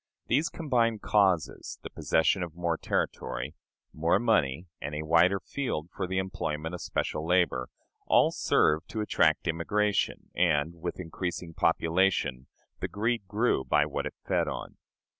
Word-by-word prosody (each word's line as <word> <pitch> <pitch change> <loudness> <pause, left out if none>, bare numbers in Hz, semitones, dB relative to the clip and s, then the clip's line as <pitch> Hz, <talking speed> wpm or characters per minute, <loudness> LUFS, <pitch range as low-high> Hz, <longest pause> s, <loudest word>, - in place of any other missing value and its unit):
These 145 +7 +2
combined 120 -8 0
causes 95 -6 +1
the - - -7
possession 80 +4 +2
of 85 -2 -5
more 85 -1 0
territory, 65 -3 -2 0.4
more 80 +2 +2
money, 90 - +1 0.2
and 75 +1 -4
a 75 - -3
wider 85 +5 +4
field 95 - -4
for 95 - -2
the 95 +1 -2
employment 85 -4 -3
of 90 - -5
special 75 - -2
labor 85 -7 +1 0.4
all - - +5
served 80 +2 +2
to 110 - -3
attract 85 -6 +2
immigration; 100 +6 0
and, 80 -2 +2
with 90 +2 -4
increasing 85 0 -4
population, 80 -6 +1 0.3
the - - -2
greed 110 0 -1
grew 105 - +1
by 65 - +3
what - - -3
it - - -9
fed - - +1
on. - - -6
90 Hz, 145 wpm, -29 LUFS, 80-100 Hz, 0.4 s, all